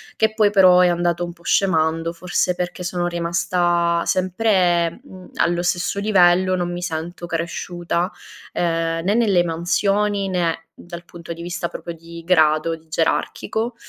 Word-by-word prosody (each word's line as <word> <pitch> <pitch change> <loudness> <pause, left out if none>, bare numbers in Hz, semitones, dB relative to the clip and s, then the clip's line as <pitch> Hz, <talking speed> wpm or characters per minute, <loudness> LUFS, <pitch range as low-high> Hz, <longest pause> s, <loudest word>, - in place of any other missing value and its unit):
che 220 0 +1
poi 210 -2 +3
però, 185 -3 +6
è 180 - +5
andato 175 0 0
un 175 - -8
po' 170 - -23
scemando 165 -3 +1
forse 180 +1 -1
perché 180 0 -5
sono 175 0 -2
rimasta 170 0 0
sempre, 185 -3 +1
mhmm, 185 -9 -13
allo 175 0 +1
stesso 180 +2 -1
livello, 185 -2 +3
non 175 -1 -2
mi 175 0 -5
sento 170 +1 -5
cresciuta, 170 +1 -3 0.4
ehm, 165 -1 -1
né 195 +4 +1
nelle 205 -7 +3
mansioni, 195 +4 0
né 170 -3 -1 0.2
dal 175 0 -9
punto 170 -1 -10
di 170 - -10
vista 175 0 -3
proprio 170 - -7
di 165 0 -11
grado, 160 -2 +3
di 160 0 -19
gerarchico. 220 +8 -1
175 Hz, 150 wpm, -21 LUFS, 170-185 Hz, 0.4 s, però